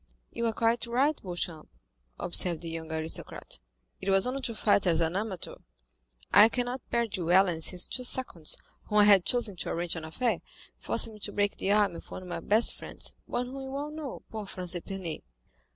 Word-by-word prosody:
"You 235 - -1
are - - +1
quite 230 +1 +1
right, 270 +6 +2
Beauchamp," 175 -4 -2 0.5
observed 175 -1 +1
the 165 -1 -5
young 165 -1 -6
aristocrat. 160 0 -3 0.4
"It 195 - -3
was 195 0 +6
only 260 +2 -2
to 235 -3 -4
fight 205 -3 +3
as 165 -2 +3
an 165 +1 0
amateur. 200 -3 -3 0.8
I 215 +2 +9
cannot 245 +1 -2
bear 235 0 +1
duelling 185 -2 +3
ever 160 - -6
since 180 +2 +5
two 255 - -3
seconds, 240 -11 +2 0.3
whom 210 - -1
I 210 - +8
had 200 -3 +6
chosen 235 -6 0
to - - -2
arrange 170 0 -2
an 165 - -5
affair, 235 +10 -1 0.4
forced - - +1
me 215 - -13
to 205 - -4
break 205 0 0
the 195 - 0
arm 205 -3 +3
of - - -10
one 185 - -7
of - - -10
my - - -3
best 220 +3 +4
friends, - - -4
one 245 - -2
whom 265 +2 -7
you 265 0 -6
all 290 +2 -4
know—poor 265 -8 -7
Franz 180 -2 -3
d'Épinay." 180 -1 -5
205 Hz, 200 wpm, -29 LUFS, 175-235 Hz, 0.8 s, I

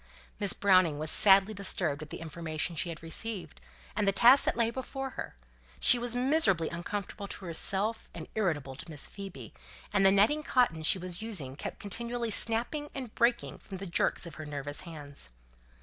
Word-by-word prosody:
Miss 205 -2 +1
Browning 185 -6 +3
was 155 +1 +1
sadly 195 +1 +6
disturbed 175 -7 0
at 155 - -9
the - - -8
information 165 0 -4
she 170 - -2
had 165 -1 -8
received, 175 - -5 0.3
and 205 - 0
the - - +5
task 240 +8 +6
that - - 0
lay 230 -1 +1
before 265 +1 -5
her; - - -7 0.4
she 245 - +8
was 240 0 -1
miserably 245 - +3
uncomfortable 200 +3 -5
to 195 - -4
herself 195 +6 -1
and - - -9
irritable 155 -11 -2
to 140 - -10
Miss 150 -3 -3
Phoebe, 195 -2 -9 0.4
and 200 -1 +3
the 195 - +7
netting 210 +11 +3
cotton 245 - +1
she 155 - +4
was 180 0 -1
using 170 - -3
kept - - -7
continually 235 +3 -3
snapping 240 +8 +1
and 255 -5 -6
breaking 235 0 0
from 195 - -9
the 195 - -7
jerks 175 0 0
of 170 - -9
her - - -7
nervous 145 0 -3
hands. 145 - -8
195 Hz, 180 wpm, -30 LUFS, 165-230 Hz, 0.4 s, she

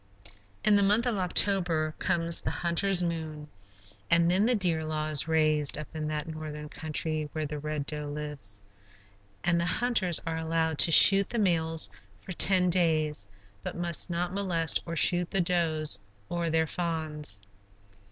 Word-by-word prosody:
In 210 -1 +4
the - - +2
month 210 +4 +2
of 240 -4 -1
October 180 -4 +3
comes 170 -2 +1
the - - -3
hunter's 180 +2 0
moon, 160 -3 -5 0.6
and 170 0 +3
then 195 +5 +2
the 250 - +2
deer 175 -6 +1
law 155 -1 -3
is 155 -1 +1
raised, 155 -2 +1
up 150 - -7
in 155 -1 -4
that 150 0 -3
Northern 155 -1 -8
country 155 0 -4
where 155 -1 -3
the 150 0 -6
Red 150 -1 -4
Doe 150 0 -5
lives; 145 -9 -7 0.8
and 170 -1 +1
the - - -1
hunters 190 -4 0
are 165 0 -3
allowed 160 -1 -2
to 165 - +6
shoot 195 +4 +8
the 240 - -4
males 165 -6 0 0.3
for - - -11
ten 180 0 +3
days, 155 - 0 0.3
but - - -7
must 175 0 +2
not 175 +1 -3
molest 175 -5 0
or 165 - -5
shoot 175 +2 +3
the 195 - 0
does 165 -3 -1 0.3
or 170 -1 -2
their 160 0 +1
fawns. 155 - -4
165 Hz, 160 wpm, -27 LUFS, 155-180 Hz, 0.8 s, shoot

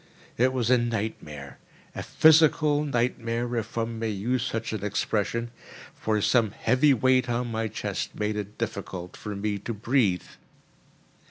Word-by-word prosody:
It 130 +2 +3
was 125 -2 0
as 125 - +6
a - - 0
nightmare—a 90 - -6
physical 155 -1 +4
nightmare, 120 -2 -1
if 115 0 -4
one 115 0 -2
may 115 0 -1
use 115 +5 -1
such 115 -3 -3
an 105 -3 -4
expression; 110 +3 -1 0.4
for 110 -1 -1
some 115 0 +3
heavy 130 +7 +2
weight 130 0 +3
on 120 0 -1
my 110 0 -1
chest 105 -2 -4
made 105 0 -1
it 105 0 -5
difficult 95 -5 -5
for 105 -1 -6
me 100 0 -2
to 115 +3 -5
breathe. 105 -4 +1
115 Hz, 150 wpm, -26 LUFS, 105-125 Hz, 0.4 s, as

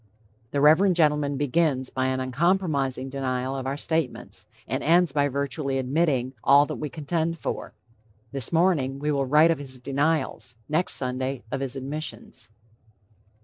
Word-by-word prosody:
The 140 - -1
Reverend 170 +6 +5
gentleman 150 -3 +2
begins 145 -2 0
by 130 0 -1
an 130 0 -1
uncompromising 140 -1 0
denial 130 -1 -2
of 130 -1 -4
our 135 +1 -2
statements, 160 -3 -3 0.2
and - - -2
ends 170 0 +3
by 145 0 +2
virtually 140 0 -2
admitting 130 -1 0
all 140 +2 +6
that - - -5
we 150 - -4
contend 165 +2 -2
for. - - -5 0.6
This 135 -3 -3
morning 160 -6 +2
we 150 +2 -1
will 140 -2 0
write 155 +4 +5
of 165 - -1
his 135 -2 -6
denials; 140 -1 -1
next 155 +4 +1
Sunday, 130 0 -2
of 135 - -2
his 135 -1 -3
admissions. 135 -4 -5
140 Hz, 150 wpm, -25 LUFS, 130-155 Hz, 0.6 s, all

